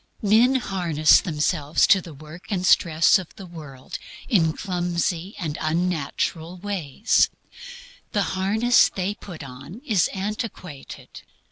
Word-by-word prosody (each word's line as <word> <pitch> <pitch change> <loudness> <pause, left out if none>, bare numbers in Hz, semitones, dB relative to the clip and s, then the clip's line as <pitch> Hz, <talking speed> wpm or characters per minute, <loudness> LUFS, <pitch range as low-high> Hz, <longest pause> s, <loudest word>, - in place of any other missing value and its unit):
Men 225 +6 +4
harness 175 - +3
themselves 150 -2 +1
to 195 -1 +5
the 165 -4 -11
work 155 +5 -12
and 185 -4 -1
stress 165 -1 +4
of 180 - -11
the 195 - -10
world 150 -7 -9 0.3
in 170 -10 +3
clumsy 175 0 -2
and 155 -5 -4
unnatural 165 +1 -2
ways. 190 - +1 0.8
The 205 -2 +1
harness 215 +6 +3
they 190 +1 -3
put 175 -6 -10
on 140 - -10
is 210 - +2
antiquated. 195 - -7
180 Hz, 120 wpm, -23 LUFS, 155-200 Hz, 0.8 s, to